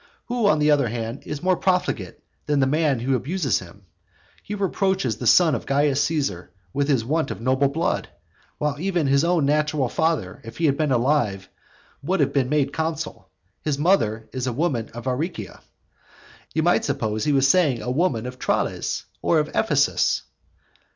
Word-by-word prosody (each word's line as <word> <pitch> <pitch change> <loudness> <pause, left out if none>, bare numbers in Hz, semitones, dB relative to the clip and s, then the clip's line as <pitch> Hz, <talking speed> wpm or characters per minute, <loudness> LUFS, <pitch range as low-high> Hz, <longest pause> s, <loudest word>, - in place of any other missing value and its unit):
Who, 240 -3 +1
on 155 - +4
the 150 0 +3
other 140 -4 +3
hand, 115 +3 -4
is 150 +1 -5
more 185 0 +3
profligate 180 - -1 0.3
than 145 -1 +2
the 135 - +4
man 145 -3 +1
who 130 +2 +1
abuses 135 - 0
him? 95 +2 -14 0.6
He 210 - -6
reproaches 190 - 0
the 120 - -3
son 170 +2 +6
of - - -3
Caius 140 0 +2
Caesar 135 - -2 0.2
with 140 0 0
his 130 -6 +1
want 155 +5 0
of - - -5
noble 130 +4 +2
blood, 155 +5 -1 0.5
when 150 -1 -2
even 180 -4 0
his 140 +1 +3
natural 150 -4 +1
father, 160 - -1
if 115 - -10
he 165 - +1
had 140 -3 +3
been 150 -1 0
alive, 120 -7 +1 0.5
would 185 +6 -1
have 145 - +2
been 130 -3 +1
made 145 -1 +1
consul. 160 - -4 0.3
His 150 -3 -1
mother 115 - +1
is 130 0 -3
a 125 - -1
woman 130 -5 -1
of 120 - -7
Aricia. 130 - -3 0.9
You - - +2
might - - +3
suppose 110 0 -2
he 150 - +2
was 135 -1 +4
saying 140 -6 +3
a 125 - -2
woman 130 -6 0
of 125 0 -7
Tralles, - - -1 0.2
or - - +2
of - - +1
Ephesus. - - +2
140 Hz, 180 wpm, -23 LUFS, 120-160 Hz, 0.9 s, son